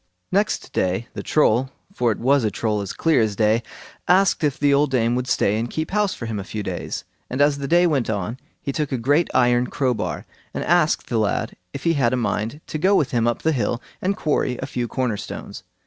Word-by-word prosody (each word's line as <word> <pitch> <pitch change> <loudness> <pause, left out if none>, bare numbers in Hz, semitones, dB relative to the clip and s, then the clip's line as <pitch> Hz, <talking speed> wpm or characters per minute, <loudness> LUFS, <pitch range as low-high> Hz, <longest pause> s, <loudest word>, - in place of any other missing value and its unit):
Next 205 +2 0
day 95 +6 -1
the - - -5
Troll—for 130 - +1
it 105 - -2
was 135 +1 +3
a 110 - +2
Troll 105 +1 -1
as 100 - -4
clear 160 -6 +2
as 110 -2 0
day—asked 120 - +1
if 145 -1 +1
the 145 -1 +3
old 145 +1 +3
dame 120 -3 +1
would 125 +1 -1
stay 105 -4 +2
and 115 +1 -2
keep 155 +4 -3
house 210 -1 +1
for 115 - -6
him 110 -2 -3
a - - -4
few 105 +1 -5
days; - - -4 0.3
and 130 - -3
as 145 0 +3
the 140 - -3
day 175 +3 +4
went 140 -9 +1
on 110 +4 -3 0.2
he 140 - -3
took 150 0 -2
a 130 - 0
great 145 +8 +2
iron 125 -1 +3
crowbar, 125 -3 -2 0.3
and - - -2
asked 170 -2 +2
the 115 - 0
lad 105 -2 -1 0.2
if 140 - -7
he 165 - +3
had 130 -5 +2
a - - +1
mind 115 +3 -2
to 155 - -4
go 190 +5 +4
with 145 -8 +2
him 120 -2 +1
up 120 - -1
the 160 - +3
hill 120 -4 0 0.2
and 195 +2 0
quarry 135 -5 0
a - - -4
few 120 -1 -3
corner 125 -3 -1
stones. - - -7
130 Hz, 225 wpm, -22 LUFS, 115-150 Hz, 0.3 s, day